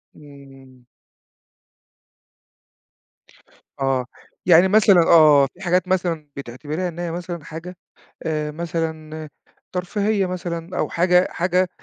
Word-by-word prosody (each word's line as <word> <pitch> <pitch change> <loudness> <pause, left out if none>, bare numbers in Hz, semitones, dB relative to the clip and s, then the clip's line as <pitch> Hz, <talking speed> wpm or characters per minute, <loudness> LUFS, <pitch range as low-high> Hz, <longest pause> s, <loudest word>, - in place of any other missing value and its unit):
إمم. 135 -3 -16 3.0
آه 135 -2 0 0.4
يعني 175 +1 +6
مثلًا 200 -3 +5
آه 150 -4 +7
في 190 - -18
حاجات 180 0 +1
مثلًا 170 -5 -1
بتعتِبريها 145 +7 -5
إن 170 +1 -10
هي 175 -1 -3
مثلًا 170 -2 -6
حاجة 170 +3 -9 0.5
آآ 150 -1 -2
مثلًا 160 -1 -5 0.4
ترفيهية 200 +2 -1
مثلًا 175 -1 -5
أو - - 0
حاجة 180 +1 +3
حاجة 180 +1 0
170 Hz, 100 wpm, -21 LUFS, 150-180 Hz, 3.0 s, آه